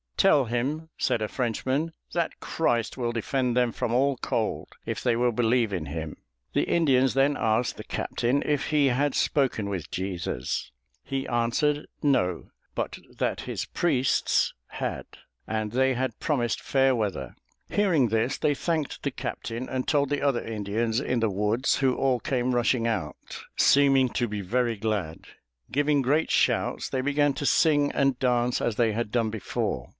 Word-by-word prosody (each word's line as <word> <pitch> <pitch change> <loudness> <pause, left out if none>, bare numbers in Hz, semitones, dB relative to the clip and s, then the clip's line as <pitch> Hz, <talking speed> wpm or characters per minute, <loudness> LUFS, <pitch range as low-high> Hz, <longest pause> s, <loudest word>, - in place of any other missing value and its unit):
"Tell 150 -9 +5
him," 135 +8 -2
said - - +1
a - - -1
Frenchman, 130 +7 -1 0.2
"that 170 -2 -1
Christ 120 -8 0
will 120 -2 -1
defend 125 +1 -1
them 125 -1 +3
from 115 - -2
all 135 +2 +2
cold, - - -2 0.2
if - - -3
they 120 -2 +2
will 120 +1 +2
believe 115 -1 +1
in 85 -5 -3
him." 80 +1 -5 0.4
The - - +2
Indians 135 -6 +3
then 140 +2 +3
asked 110 +2 +1
the - - -7
captain 125 +4 -1
if 145 -2 0
he 150 -2 +3
had 135 +2 +1
spoken 130 -8 +1
with 90 -5 -4
Jesus. 90 -9 -3 0.3
He 135 -1 -3
answered 125 +5 0 0.2
No; 90 - +1 0.3
but - - -3 0.2
that - - -1
his - - -4
priests 135 -7 +1
had, - - -4 0.4
and 110 -1 -2
they 130 +2 +2
had 125 -2 -2
promised 125 -7 0
fair 135 -1 +2
weather. 100 - -3 0.3
Hearing 170 - +2
this, 115 +5 0
they 145 - +2
thanked 155 0 -2
the - - -2
captain 120 +3 -5
and 130 -1 -2
told 145 -2 +2
the 145 -1 -1
other 140 -4 +1
Indians 110 +2 -1
in 125 -3 -1
the 110 -2 +1
woods, 105 +6 +1
who 130 -2 +2
all 130 -2 +1
came 125 +1 0
rushing 120 -1 +2
out, 80 - -2 0.4
seeming 135 -2 +5
to 120 +1 -1
be 105 -1 -4
very 120 +4 0
glad. 100 -7 -3 0.5
Giving 145 +1 +2
great 145 +5 +2
shouts, - - +1
they 130 - -1
began 145 +1 +2
to 145 - -4
sing 145 -1 +3
and 135 -2 +1
dance 125 -1 +1
as 115 - 0
they 115 -1 +2
had 115 -1 -2
done 115 -2 +1
before. 90 - -3
125 Hz, 165 wpm, -26 LUFS, 110-140 Hz, 0.5 s, Tell